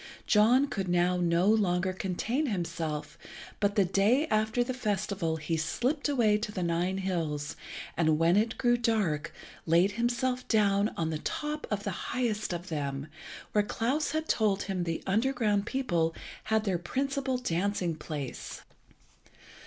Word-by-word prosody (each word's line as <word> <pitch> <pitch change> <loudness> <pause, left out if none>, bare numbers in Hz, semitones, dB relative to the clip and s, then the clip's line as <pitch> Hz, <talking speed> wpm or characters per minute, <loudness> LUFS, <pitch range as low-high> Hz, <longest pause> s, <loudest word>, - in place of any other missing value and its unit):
John 235 +6 +5
could 200 -9 -3
now 175 +1 +2
no 170 0 +2
longer 185 -4 +2
contain 220 - -1
himself, 165 - -3 0.4
but 205 -1 +1
the 200 -3 +4
day 205 - +3
after 220 +3 +2
the 255 +1 -3
festival 200 -7 -1
he 160 +1 -2
slipt 255 - -1
away 220 -7 +3
to 210 0 -4
the 185 -3 -3
Nine 175 +3 0
hills, 160 -6 -2 0.4
and 160 -2 +3
when 165 +2 +4
it 220 +3 +1
grew 240 -1 +3
dark 205 -10 0 0.4
laid 170 +5 +4
himself 240 +3 -1
down 205 -1 +3
on 160 -1 -1
the 155 - -2
top 300 - -3
of 205 -1 -2
the 200 - -2 0.2
highest 230 -6 -1
of 175 +1 -5
them, 140 -2 -3 0.4
where 210 - +3
Klas 255 +8 -1
had 315 +1 -2
told 205 -3 +2
him 185 -3 -2
the 165 -1 -3
underground 215 -1 +1
people 170 -12 0 0.3
had 220 0 +2
their 190 -5 0
principal 270 - -1
dancing 185 -4 -1
place. 150 -4 -6
200 Hz, 150 wpm, -29 LUFS, 170-235 Hz, 0.4 s, John